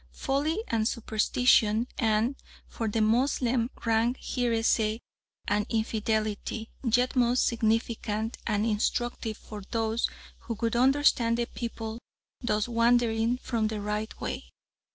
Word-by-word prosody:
Folly 300 +9 -1
and 220 -1 +1
superstition, 225 0 +2
and, 225 +3 +2 0.3
for 225 - -4
the 220 +1 0
Moslem, 240 +1 +2 0.2
rank 230 +2 +2
heresy 225 -2 +1 0.5
and 205 +1 +1
infidelity, 220 0 -1
yet 245 +2 +2
most 245 0 +3
significant 225 -1 -1
and 210 -1 +1
instructive 225 +1 -1
for 210 -1 -9
those 225 0 0 0.3
who 230 - -5
would 230 0 0
understand 250 -2 +3
the 240 - 0
people 225 -1 -6 0.4
thus 210 -3 0
wandering 235 0 +2
from 230 -3 -1
the 215 -1 -3
right 210 +1 -3
way. - - -5
230 Hz, 115 wpm, -28 LUFS, 220-240 Hz, 0.5 s, most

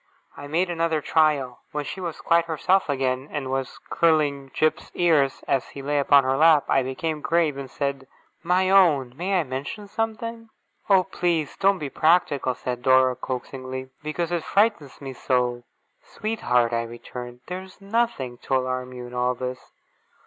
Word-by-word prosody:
I 145 - -9
made 175 +4 0
another 165 -2 0
trial. 145 -5 +1
When 150 -1 -2
she 190 - -6
was 170 -3 -5
quite 170 0 +3
herself 170 +3 +1
again, 130 0 -1
and 135 -3 -3
was 135 -1 -3
curling 150 -4 +2
Jip's 155 0 0
ears, 155 -6 +2
as 135 -2 +1
he 140 - -9
lay 145 +1 0
upon 140 0 +5
her 130 +1 +1
lap, 155 -1 +6
I 135 - +3
became 150 +4 -3
grave, 165 -3 +1
and 135 -1 -7
said: 140 -1 -3 0.3
'My 180 +2 +2
own! 150 -10 +4
May 185 +4 0
I - - +1
mention 145 - -6
something?' 225 +1 -4 0.4
'Oh, 190 -2 +6
please 175 -5 -1
don't 195 0 +3
be 145 -5 -5
practical!' 150 -6 +2
said 125 -1 -4
Dora, 130 0 +4
coaxingly. 130 +1 -6
'Because 160 +3 -3
it 170 -2 -1
frightens 200 - +1
me 135 -1 -6
so!' 125 -1 -1 0.4
'Sweetheart!' 125 - 0
I 115 - +1
returned; 120 +1 -8
'there 180 +1 -5
is 190 -1 -15
nothing 200 - -1
to 135 - -1
alarm 130 0 -2
you 125 -1 -7
in 120 - -11
all 125 0 0
this. 125 +1 -6
145 Hz, 170 wpm, -24 LUFS, 130-175 Hz, 0.4 s, lap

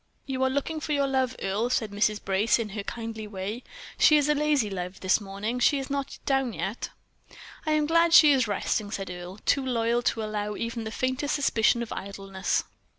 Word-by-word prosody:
"You 265 -1 -3
are 265 - +3
looking 285 +4 -2
for 300 0 -3
your 280 -1 +2
love, 260 -2 0
Earle," 205 +5 -1
said 220 -4 0
Mrs. 210 +1 0
Brace, 195 +3 +2
in 230 -2 -3
her 205 +1 -4
kindly 225 0 -6
way. 205 +4 -5 0.4
"She 305 - +7
is 290 -1 +2
a - - +5
lazy 295 -5 +2
love 180 0 -5
this 190 +3 +2
morning. 205 +5 -4
She 285 +4 +4
is 270 0 -5
not 280 -1 -3
down 270 -4 +1
yet." 205 +4 -4 0.8
"I 310 - +3
am 305 -1 +2
glad 335 +2 +3
she 305 -2 +8
is 260 -5 +3
resting," 205 +1 -1
said 195 -3 -4
Earle, 180 +2 -8
too 275 - +2
loyal 235 -2 +1
to 225 -2 0
allow 210 -1 -3
even 230 0 -4
the 220 - -4
faintest 260 +4 -1
suspicion 235 -4 +2
of 230 - -6
idleness. 195 -1 -2
230 Hz, 205 wpm, -27 LUFS, 205-270 Hz, 0.8 s, she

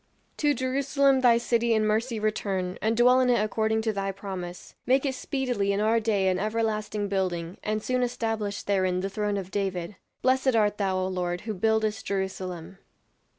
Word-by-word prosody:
"To 295 -1 +2
Jerusalem 270 +1 +2
thy 240 -2 +6
city 235 -1 +1
in 215 0 +2
mercy 220 +2 0
return, 195 -4 -2
and 220 +1 +1
dwell 250 +2 +6
in 255 - +2
it 240 - +4
according 220 +1 0
to 220 -1 0
thy 195 -1 -2
promise; 185 -3 -7
make 265 +3 +3
it 270 - 0
speedily 250 -7 -1
in 200 - 0
our 220 +2 +3
day 210 -4 +1
an 185 0 +1
everlasting 215 -1 -1
building, 180 -3 -2
and 215 0 -2
soon 255 0 0
establish 225 -4 -2
therein 185 -2 +1
the 195 +1 -3
throne 205 0 -1
of 190 -1 -6
David. 190 -2 -3 0.3
Blessed 260 -1 +3
art 210 -1 +2
thou, 190 -2 +1
O 185 0 0
Lord, 180 -1 -2
who 220 - -4
buildest 220 +2 0
Jerusalem." 190 -2 -4
215 Hz, 180 wpm, -27 LUFS, 190-235 Hz, 0.3 s, thy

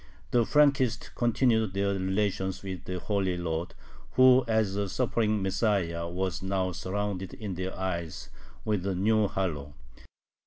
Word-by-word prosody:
The 120 -2 +3
Frankists 135 -5 +2
continued 115 -3 +2
their 100 0 +1
relations 95 0 -1
with 95 -2 -6
the 90 - -3
"Holy 95 -1 -1
Lord," 85 0 -3 0.4
who 130 0 +7
as 110 -3 +1
a 100 -1 -1
suffering 110 -2 0
Messiah 95 -4 0
was 90 0 -2
now 95 -1 -1
surrounded 95 0 -3
in 105 -4 -5
their 95 +1 -4
eyes 85 -5 -4 0.4
with 105 -4 0
a 95 - 0
new 105 +3 +3
halo. 75 -8 -3
95 Hz, 140 wpm, -28 LUFS, 90-110 Hz, 0.4 s, who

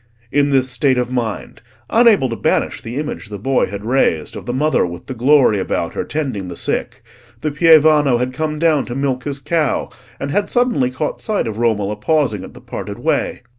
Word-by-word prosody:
In 145 0 +2
this 135 -2 +2
state 130 +1 +1
of 125 0 -1
mind—unable 130 - 0
to 115 - -3
banish - - 0
the 115 +2 -7
image 150 -7 -5
the 105 - -6
boy 135 +6 +1
had 100 +2 -7
raised 115 - +1
of - - -8
the - - -1
Mother 155 +1 +2
with 85 -1 -5
the - - -5
glory 130 -3 +4
about - - -2
her - - -2
tending 130 -11 -3
the 90 - -7
sick—the 120 +3 -5
pievano 155 -4 +5
had 125 +1 -2
come 155 +1 -2
down 155 -3 +2
to 120 - -6
milk 135 -2 -1
his 140 -1 -3
cow, 155 +2 -1 0.3
and 140 - -3
had 205 +3 0
suddenly 245 - +1
caught 130 +4 -4
sight 215 -2 -1
of 110 -1 -4
Romola 105 -3 0
pausing 115 - 0
at - - -11
the - - -12
parted - - -6
way. - - -1
130 Hz, 195 wpm, -18 LUFS, 115-150 Hz, 0.3 s, pievano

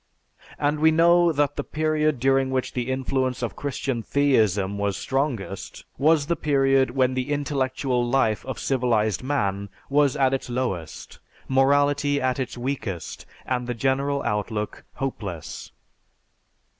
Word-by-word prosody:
And 145 +1 0
we 160 +1 +5
know 170 +2 +5
that 145 -1 0
the - - -1
period 155 -2 0
during 135 +1 +2
which 130 -1 -2
the 125 0 -2
influence 130 -1 -1
of 120 - -3
Christian 135 -3 -3
theism 105 -8 +1
was 100 -2 -1
strongest, 130 -8 -3
was 150 0 +4
the 170 +3 0
period 135 -3 +2
when 130 0 +1
the 130 +2 -2
intellectual 135 -3 0
life 120 -3 +1
of 130 - -4
civilized 115 -6 +1
man 100 -8 -1 0.2
was 145 -1 +3
at 135 -1 +3
its 135 -1 -3
lowest, 110 -11 -4 0.3
morality 145 +2 +3
at 130 0 0
its 130 -1 -4
weakest, 115 - -4 0.2
and 125 -1 -2
the 125 - -2
general 140 +3 0
outlook 105 -1 -3
hopeless. 100 - -5
130 Hz, 135 wpm, -24 LUFS, 120-145 Hz, 0.3 s, we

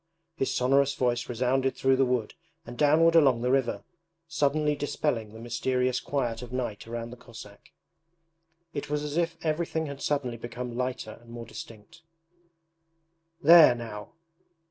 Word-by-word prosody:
His 135 - -1
sonorous 135 +2 +2
voice 120 -1 -1
resounded 130 +2 0
through 135 0 +2
the 135 0 +2
wood 125 -4 -1 0.3
and 120 - -9
downward 155 +5 +4
along 135 -8 +5
the 125 +1 +1
river, 135 -3 0 0.4
suddenly 150 -1 +1
dispelling 140 -6 -2
the 110 - -11
mysterious 125 +2 -1
quiet 120 -5 -2
of 125 -1 -9
night 120 -5 -4
around 115 0 -5
the 125 - -10
Cossack. 110 -4 -13 1.0
It 145 0 -5
was 150 0 -1
as 150 0 -4
if 170 0 0
everything 160 0 -1
had 140 -2 -7
suddenly 135 -5 -1
become 120 +1 -6
lighter 125 -3 -4
and 120 - -18
more 115 0 -8
distinct. 110 +5 -11 1.4
'There 160 -4 +8
now. 110 -3 -8
125 Hz, 145 wpm, -27 LUFS, 120-145 Hz, 1.4 s, There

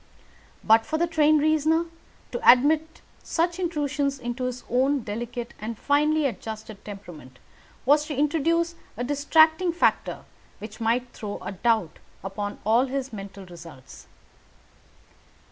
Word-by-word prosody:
But 225 +1 +5
for 315 - -2
the 340 - +2
trained 310 -2 +3
reasoner 315 +2 +2 0.5
to 485 - +6
admit 310 +5 +1 0.2
such 345 +2 -1
intrusions 290 -5 -1
into 250 0 -4
his 250 0 -4
own 265 +3 +1
delicate 235 +2 -5
and 220 +1 -5
finely 300 +3 +2
adjusted 220 -4 -5
temperament 175 -11 -11 0.5
was 295 +3 +4
to 295 - -4
introduce 330 +3 +1 0.2
a 245 - -2
distracting 315 +5 +3
factor 340 - 0 0.3
which 215 +2 -10
might 240 +2 0
throw 205 -2 -6
a - - -4
doubt 215 -3 0 0.2
upon 205 +1 -4
all 235 +5 +3
his 265 -1 -4
mental 195 -1 -8
results. 160 - -13
255 Hz, 130 wpm, -25 LUFS, 215-310 Hz, 0.5 s, to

